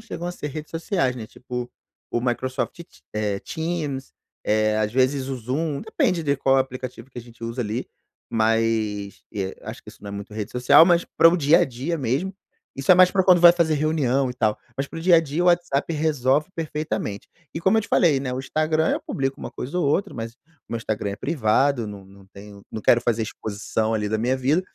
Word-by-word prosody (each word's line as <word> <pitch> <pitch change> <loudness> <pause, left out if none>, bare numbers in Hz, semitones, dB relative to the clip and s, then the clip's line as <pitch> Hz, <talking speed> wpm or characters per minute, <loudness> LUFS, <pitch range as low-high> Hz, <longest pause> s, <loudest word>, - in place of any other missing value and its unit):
chegam 175 - -6
a 175 - -3
ser 150 - -5
redes 155 +2 -7
sociais, 165 - 0
né, 115 -3 -7
tipo, 125 -1 -6 0.4
o 120 - 0
Microsoft 130 +2 -2
te 170 - -9 0.3
eh, 105 -2 -1
Teams, 160 -5 -4 0.3
eh, 110 0 +2
às 105 -1 0
vezes 130 +1 +1
o 135 - -3
Zoom, 140 +5 -2
depende 170 -2 0
de 140 -1 +1
qual 135 0 +3
aplicativo 130 -2 -3
que 130 - -10
a 120 - -7
gente 115 -1 -12
usa 115 +2 -4
ali, 110 +3 -3 0.4
mas, 110 -2 0
eh, 95 -3 -4
acho - - -8
que - - -16
isso - - -14
não 100 - -8
é - - -5
muito 100 +1 -7
rede 110 0 -4
social, 125 +6 +6
mas 175 -1 +3
para 165 - +8
o 175 - +3
dia 155 +1 +5
a - - +4
dia 135 +5 -3
mesmo, 145 +8 -1 0.4
isso 135 +4 0
é - - +10
mais 185 0 +7
para 190 +1 +2
quando 180 -2 +5
vai 175 0 +9
fazer 170 -3 +1
reunião 140 -3 +1
e 125 - -5
tal, 110 -3 0 0.2
mas 135 +1 -2
para - - -7
o - - -6
dia 175 +1 +5
a 165 - +7
dia 160 +2 -2
o - - +2
WhatsApp 175 -4 +2
resolve 150 -1 +1
perfeitamente. 150 -10 -4 0.3
E 165 - -3
como 190 +5 +3
eu - - +1
te - - -8
falei, 155 -6 +3
né, 135 -1 -3
o 125 - -3
Instagram 155 +3 0
eu - - 0
publico 135 -1 -3
uma - - -6
coisa 140 +8 -5
ou 175 - +1
outra 150 +8 +1
mas, 115 -1 -6 0.3
meu 115 - -3
Instagram 110 -3 -3
é 100 - -5
privado, 130 -1 +1
não 100 -2 -9
não 95 0 -17
tenho 100 0 -12
não 110 - -5
quero 120 - +5
fazer 115 -1 0
exposição 110 +1 -2
ali 105 -1 -1
da 110 +1 -1
minha 125 +4 +1
vida, 135 +6 +2
130 Hz, 225 wpm, -23 LUFS, 115-155 Hz, 0.4 s, é